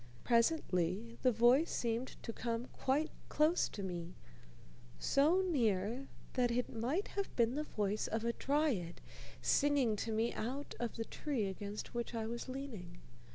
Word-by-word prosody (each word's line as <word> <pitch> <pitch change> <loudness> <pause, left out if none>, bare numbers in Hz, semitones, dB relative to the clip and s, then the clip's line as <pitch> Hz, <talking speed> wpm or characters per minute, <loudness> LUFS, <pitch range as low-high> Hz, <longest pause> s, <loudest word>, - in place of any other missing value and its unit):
Presently 230 - +1
the 255 - +5
voice 245 +8 +5
seemed 235 +2 -1
to 230 - -4
come 235 +1 -2
quite 295 +5 +1 0.2
close 310 +4 +3
to 200 - -6
me, 175 -2 -4 0.8
so 300 - +4
near 240 - +1 0.3
that 250 -2 +2
it 245 +1 -1
might 265 - 0
have 400 -1 -3
been 235 0 +3
the 300 +2 -1
voice 210 -3 -1
of 225 +1 -2
a 235 - +1
dryad 270 - 0 0.4
singing 280 -6 +3
to 225 - -2
me 225 +2 +1
out 265 +6 -4
of 240 -1 -2
the 225 - -3
tree 270 -6 -2
against 200 +2 -5
which 235 0 -3
I 225 -1 -1
was 235 +3 -4
leaning. 230 -11 -6
235 Hz, 155 wpm, -36 LUFS, 215-275 Hz, 0.8 s, the